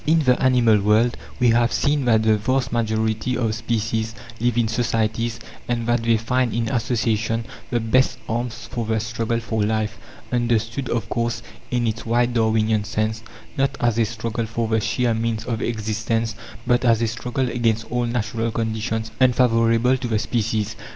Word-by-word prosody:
In 160 +2 +5
the 125 -4 +2
animal 120 -5 +4
world 110 +4 +3 0.2
we 125 -1 +4
have 120 0 +3
seen 145 -2 +1
that 110 -2 +4
the 110 -1 +4
vast 130 +5 0
majority 110 +1 0
of 115 -3 0
species 115 0 -2 0.2
live 120 0 +1
in 115 -2 +3
societies, 115 0 -1 0.3
and 120 -1 -1
that 120 0 +1
they 115 0 +3
find 120 +1 0
in 115 -1 0
association 115 -2 0 0.2
the 120 - +1
best 125 +3 +2
arms 120 +1 -3
for 120 - -2
the 110 0 +1
struggle 115 +1 -2
for 110 -1 -2
life: 110 +1 -1 0.3
understood, 120 +1 0
of 115 - -1
course, 115 -1 -2 0.3
in 120 -1 0
its 110 -1 -2
wide 120 +1 +1
Darwinian 110 -2 +2
sense 110 +1 -2 0.3
not 135 0 0
as 120 -1 +1
a 115 - +4
struggle 115 +1 -3
for 115 +1 -2
the 110 0 +2
sheer 120 +2 +1
means 115 0 -2
of 115 -2 -2
existence, 110 0 -1 0.3
but 120 0 +2
as 115 -3 +4
a - - +2
struggle 125 +3 -2
against 115 -2 0
all 120 0 0
natural 115 -1 -1
conditions 110 0 -2
unfavourable 120 -1 +3
to 125 -1 -4
the 110 -2 +1
species. 110 -1 -1
115 Hz, 170 wpm, -22 LUFS, 110-120 Hz, 0.3 s, In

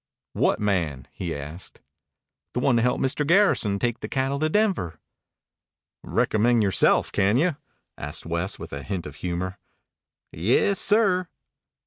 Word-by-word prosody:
"What - - +1
man?" 85 - -1
he 85 -3 -4
asked. 75 +6 -8 0.8
"The - - +1
one 125 0 +3
to - - +3
help 125 +1 +1
Mr. 135 +3 0
Garrison 160 - +3
take 120 +2 -1
the - - -6
cattle 135 +1 -1
to 155 +1 +1
Denver." 175 - 0 1.0
"Recommend 115 +1 +2
yoreself, 95 -2 +3
can 100 +3 +2
you?" 165 +2 +2 0.4
asked 75 +3 -6
West 85 +3 -2
with - - -9
a 70 - -4
hint 95 +1 -4
of 75 -1 -9
humor. 90 +2 -4 0.7
"Yes, 120 - +2
sir." 195 -4 +3
105 Hz, 140 wpm, -25 LUFS, 85-140 Hz, 1.0 s, one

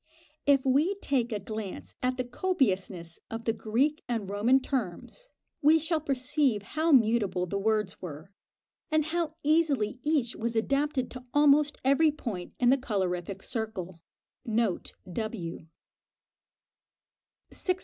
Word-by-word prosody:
If 275 -2 +4
we 295 +9 +3
take 265 -11 -1
a 210 - -1
glance 215 -1 -6
at 255 0 0
the 255 - 0
copiousness 200 - -1
of 225 +1 -6
the 225 - +2
Greek 260 +9 0
and 225 -5 -1
Roman 215 +7 +3
terms, 260 - -4 0.3
we 305 +2 +6
shall 320 0 0
perceive 275 -5 0
how 315 +9 0
mutable 215 - +3
the 200 +3 -2
words 210 -1 0
were, 160 +1 -8 0.6
and 310 -1 +2
how 320 -1 -1
easily 290 -7 +2
each 290 -6 +1
was 230 +1 -3
adapted 275 +3 0
to 250 -1 -9
almost 295 0 +5
every 280 +4 +5
point 220 -12 -6
in 245 -1 +5
the 275 - +5
colorific 195 -5 -2
circle. 205 -8 -5 0.4
Note 220 -4 -1 0.2
W. 180 -7 -4 1.8
609. 365 -1 -1
245 Hz, 130 wpm, -29 LUFS, 205-290 Hz, 1.8 s, we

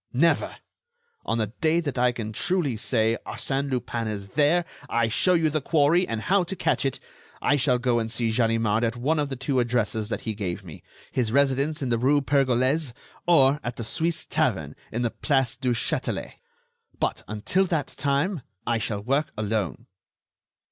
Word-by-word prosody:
"Never! 165 +7 +2 0.7
On - - +1
the 110 -1 -2
day 160 +1 +3
that 145 -6 -3
I 125 0 +4
can 110 -3 -5
truly 160 - 0
say: 110 +1 +1
Arsène 140 +1 -2
Lupin 120 -3 -2
is 100 -2 -5
there; 155 - +3 0.2
I 115 -1 +1
show 180 - +3
you 160 -2 +2
the 155 0 0
quarry, 160 +5 +3
and 115 -1 -3
how 190 - +2
to 195 - -4
catch - - 0
it; 135 - -1 0.4
I 145 - +2
shall 130 -2 +2
go 125 -1 +1
and 115 -1 -3
see 115 0 0
Ganimard 115 -1 +1
at 115 +1 0
one 150 +6 +1
of 145 -1 -1
the 135 - -3
two 130 +1 0
addresses 115 -3 0
that - - -3
he 110 - -3
gave 95 -2 -4
me—his 110 - -5
residence 140 +3 +2
in 130 - -1
the 115 -1 +1
rue 140 +4 +4
Pergolese, 135 0 +1 0.3
or 140 -4 +5
at 120 0 -4
the 115 - -5
Suisse 165 +8 0
tavern - - -1 0.2
in 120 +2 -1
the 120 - 0
Place 135 -4 +1
du 125 -1 -1
Châtelet. 115 - -2 0.7
But, - - -1
until 110 - 0
that 165 -5 -1
time, 145 +5 0 0.2
I 120 -1 +1
shall 105 -2 -2
work 140 +5 0
alone." 105 -1 -2
125 Hz, 180 wpm, -25 LUFS, 115-145 Hz, 0.7 s, or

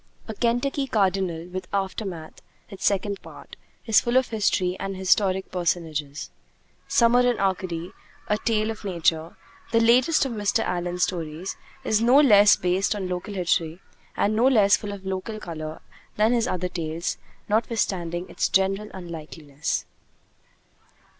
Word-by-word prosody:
'A 220 - -4
Kentucky 245 +5 0
Cardinal,' 190 -7 0
with 185 0 -6
'Aftermath,' 190 -4 -4 0.3
its 195 -1 -9
second 200 0 0
part, - - -12 0.3
is 225 -2 +5
full 240 +1 +1
of 260 - +2
history 195 -4 +1
and 195 0 -4
of - - -8
historic 190 0 +1
personages. 160 -5 -2 0.6
'Summer 235 +1 +4
in 245 -1 +3
Arcady: 185 -2 -2 0.4
A 210 0 +1
Tale 220 -1 0
of 220 - -9
Nature,' 165 -3 0 0.3
the 230 - +4
latest 250 +7 +4
of 265 - -3
Mr. 210 -3 0
Allen's 180 0 -1
stories, 170 0 -3 0.3
is 220 -4 +1
no 245 +4 +6
less 210 -8 +7
based 185 +4 0
on 195 -3 -3
local 180 +3 -4
history 170 -2 0 0.4
and 210 +1 +1
no 235 +4 +4
less 210 -6 +5
full 210 -2 -6
of 195 -1 -9
local 190 +3 -4
color 155 -4 -7 0.3
than 215 +3 +3
his 240 0 +1
other 180 -5 -1
tales, 170 -1 -4 0.3
notwithstanding 190 -6 -1
its - - -1
general 195 +2 +1
unlikeness. 160 -4 -5
195 Hz, 145 wpm, -25 LUFS, 175-220 Hz, 0.6 s, less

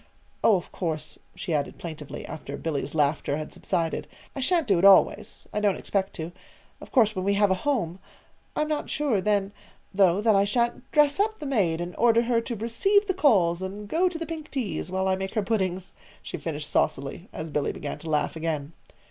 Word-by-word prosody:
Oh, 220 - +6
of 180 - -4
course," 155 -4 -4 0.2
she 175 - -3
added 145 -2 -1
plaintively, 155 -4 -7
after 140 -2 -7
Billy's 145 -2 -3
laughter 145 -1 +1
had 155 - -6
subsided, 165 -1 -2 0.3
"I - - -4
sha'n't 330 +4 +2
do 195 -7 +3
it - - -1
always. 195 -1 +5
I 210 - 0
don't 205 -3 +2
expect 195 -1 -2
to. 165 0 -5 0.5
Of - - -11
course, 220 -5 +4
when 185 - -2
we 200 +1 +2
have 205 -1 +3
a - - +6
house 190 - -1 0.6
I'm 305 - +1
not 305 -1 -2
sure, 270 -10 +1
then, 200 0 +1 0.4
though, 190 -1 +4
that 215 0 +4
I 195 - +5
sha'n't 235 +4 -1
dress 295 +2 +4
up 435 +2 +1
the 300 - -7
maid 195 - +1
and 175 +1 -5
order 235 0 +4
her 235 -1 +2
to 235 +1 -4
receive 390 - +2
the 380 - 0
calls 190 - +3
and 200 +2 -5
go 355 - +2
to 345 - -6
the 330 - -4
pink 320 -2 -6
teas, 245 -9 -3
while 190 +1 0
I 190 - +3
make 190 +3 -5
her 215 - +1
puddings," 190 -3 -1 0.3
she - - -5
finished 150 -2 -4
saucily, 150 +5 -1
as 160 0 -6
Billy 145 -1 0
began 145 - -6
to 165 - -7
laugh 150 +1 0
again. 160 -2 -3
195 Hz, 205 wpm, -26 LUFS, 165-235 Hz, 0.6 s, Oh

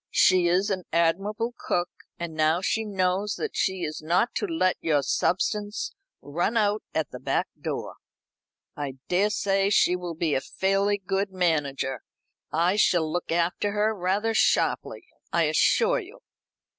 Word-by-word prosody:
She 185 -2 +4
is 190 +4 +2
an 185 -3 -2
admirable 200 +8 0
cook, 175 0 -1 0.3
and 170 -1 -5
now 155 +2 +2
she 220 +4 -1
knows 195 0 0
that - - -4
she 190 -2 0
is 155 - -4
not 175 +9 +1
to 415 - -1
let 320 - +1
your 150 -3 +2
substance 205 - -1 0.3
run 175 - -1
out 210 -1 +2
at - - -2
the - - -7
back - - -1
door, - - -4 0.8
I 145 -4 -4 0.2
daresay 195 +1 +2
she 200 -3 +4
will 175 -2 -5
be 160 -2 0
a 130 - +1
fairly 195 +5 0
good 195 +1 -2
manager. 145 -8 -1 0.5
I 175 +5 +2
shall 175 -6 +3
look 175 0 -3
after 175 +4 0
her 210 +1 +1
rather 205 +3 0
sharply, - - +1 0.3
I - - +2
assure - - +3
you. 440 +4 -12
185 Hz, 150 wpm, -26 LUFS, 170-205 Hz, 0.8 s, She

